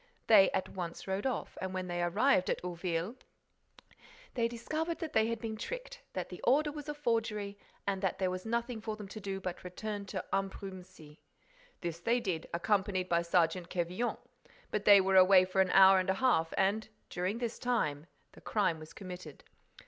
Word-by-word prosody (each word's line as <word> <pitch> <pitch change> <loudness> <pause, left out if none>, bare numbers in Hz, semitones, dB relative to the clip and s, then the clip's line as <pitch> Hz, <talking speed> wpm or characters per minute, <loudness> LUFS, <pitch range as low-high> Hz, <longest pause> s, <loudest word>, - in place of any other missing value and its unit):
They 200 -4 +7
at - - -2
once 175 -1 -6
rode 190 +6 -1
off, 255 - -3
and 185 0 -3
when 185 0 -2
they 175 -1 -3
arrived 185 +4 +3
at - - 0
Ouville—" 175 +4 -3 1.2
"They 235 -2 +1
discovered 310 +8 -3
that 320 -3 -5
they 220 0 +3
had 230 -1 -2
been 220 -1 -4
tricked, - - -6
that - - -4
the - - -9
order 295 +4 +3
was 295 0 -7
a 295 - -3
forgery 225 -6 -1 0.3
and 195 -1 -1
that 190 -3 0
there 185 -1 0
was 185 0 -4
nothing 235 0 -2
for 220 0 -4
them 210 -2 -8
to 215 - -7
do 195 -1 -4
but 185 -2 -5
return 200 +3 -5
to - - -4
Ambrumésy." 185 -5 -5 0.6
"This 170 -1 -4
they 235 +7 +2
did, 180 -8 -3
accompanied 185 0 0
by 170 0 +3
Sergeant 170 0 +1
Quevillon. 180 +7 -1 0.5
But 210 -1 -2
they 200 -1 +9
were 190 0 +3
away 185 0 +7
for 185 +1 +2
an 190 - +2
hour 190 0 +7
and 185 +1 -1
a 190 - +3
half 190 -10 +2
and, 205 +3 +1 0.2
during 185 +5 -1
this 235 -1 -4
time, 165 -12 -1 0.2
the - - -16
crime 185 -7 0
was 155 0 -11
committed." 180 -6 -9
195 Hz, 185 wpm, -32 LUFS, 180-225 Hz, 1.2 s, they